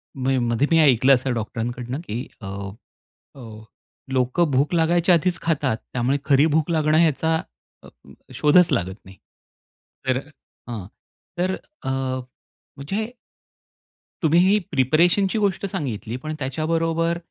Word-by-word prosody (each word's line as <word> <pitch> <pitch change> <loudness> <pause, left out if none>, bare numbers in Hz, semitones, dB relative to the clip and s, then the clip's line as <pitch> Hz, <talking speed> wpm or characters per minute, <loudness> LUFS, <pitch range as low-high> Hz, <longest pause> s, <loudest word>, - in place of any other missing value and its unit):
मी 130 0 0
मध्ये 120 +3 +1
मी 165 - +5
ऐकलं 135 -2 +5
असं 130 0 -2
डॉक्टरांकडनं 120 +3 -4
की 115 +4 -4
अ, 95 - -7 0.9
अ, 135 - -13 0.7
लोकं 130 +6 +1
भूक 140 +5 +1
लागायच्या 170 +2 +3
आधीचं 175 +1 +1
खातात. 145 -7 +1 0.2
त्यामुळे 125 +3 0
खरी 140 0 +4
भूक 160 +1 +1
लागणं 155 -1 +2
ह्याचा 160 0 +2 0.5
अ, - - -14 0.5
शोधचं 160 +1 +4
लागत 95 -4 -2
नाही. 95 0 -14 0.9
तर 130 -1 +2
अ, 145 +3 -11 0.4
हां. 105 -6 -5 0.5
तर 185 +2 +1 0.3
अ, - - -5
म्हणजे 135 - -5 1.2
तुम्ही 160 +2 +4
ही 205 - +4
प्रिपरेशनची 170 - +2
गोष्ट 200 -2 0
सांगितली. 120 - -4
पण 155 - -4
त्याच्याबरोबर 165 +4 0
145 Hz, 125 wpm, -23 LUFS, 130-165 Hz, 1.2 s, मी